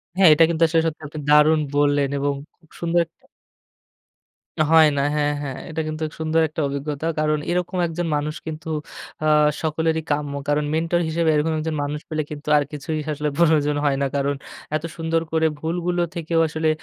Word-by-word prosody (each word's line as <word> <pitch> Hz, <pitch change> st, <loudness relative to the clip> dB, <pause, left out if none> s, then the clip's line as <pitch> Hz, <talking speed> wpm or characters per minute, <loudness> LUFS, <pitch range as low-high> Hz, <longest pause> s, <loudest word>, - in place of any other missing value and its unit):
হ্যাঁ। 190 Hz, -3 st, +7 dB
এটা 165 Hz, -, +5 dB
কিন্তু 165 Hz, 0 st, +1 dB
আসলে 165 Hz, 0 st, +2 dB
সত্যি, 160 Hz, -1 st, -3 dB
আপনি 150 Hz, +1 st, -8 dB
দারুন 150 Hz, +1 st, +6 dB, 0.2 s
বললেন। 145 Hz, -1 st, +2 dB
এবং 140 Hz, 0 st, 0 dB, 0.3 s
খুব 160 Hz, -, -27 dB
সুন্দর 170 Hz, 0 st, +1 dB
একটা 160 Hz, -, -33 dB, 1.5 s
হয় 160 Hz, -1 st, +8 dB
না। -, -, +2 dB
হ্যাঁ, 145 Hz, 0 st, +1 dB
হ্যাঁ। 135 Hz, -2 st, -5 dB
এটা 160 Hz, 0 st, -2 dB
কিন্তু 155 Hz, 0 st, -4 dB, 0.2 s
সুন্দর 160 Hz, +1 st, +1 dB
একটা 155 Hz, -, -4 dB
অভিজ্ঞতা। 140 Hz, +2 st, -3 dB
কারণ, 155 Hz, 0 st, +2 dB
এরকম 180 Hz, +1 st, -1 dB
একজন 165 Hz, +1 st, -3 dB
মানুষ 150 Hz, +1 st, -2 dB
কিন্তু 160 Hz, +1 st, -6 dB, 0.6 s
আ -, -, +2 dB, 0.3 s
সকলেরই 160 Hz, 0 st, 0 dB
কাম্য। 145 Hz, -1 st, -1 dB
কারণ, 145 Hz, 0 st, +1 dB
মেন্টর 165 Hz, +2 st, +1 dB
হিসেবে 160 Hz, 0 st, +1 dB
এরকম 160 Hz, +2 st, +1 dB
একজন 155 Hz, 0 st, -2 dB
মানুষ 150 Hz, +1 st, -4 dB
পেলে 155 Hz, -1 st, -1 dB
কিন্তু, 150 Hz, 0 st, -8 dB
আর 145 Hz, -, +3 dB
কিছুই 155 Hz, +2 st, -4 dB
আসলে 150 Hz, +1 st, -2 dB
প্রয়োজন 150 Hz, -3 st, +3 dB
হয় 140 Hz, -1 st, +2 dB
না। 140 Hz, -, +2 dB
কারণ, 140 Hz, 0 st, 0 dB, 0.4 s
এত 155 Hz, -, -2 dB
সুন্দর 165 Hz, 0 st, 0 dB
করে 160 Hz, 0 st, +3 dB
ভুলগুলো 175 Hz, +2 st, -1 dB
থেকেও 165 Hz, 0 st, 0 dB
আসলে, 160 Hz, +1 st, 0 dB
155 Hz, 180 wpm, -22 LUFS, 150-165 Hz, 1.5 s, হয়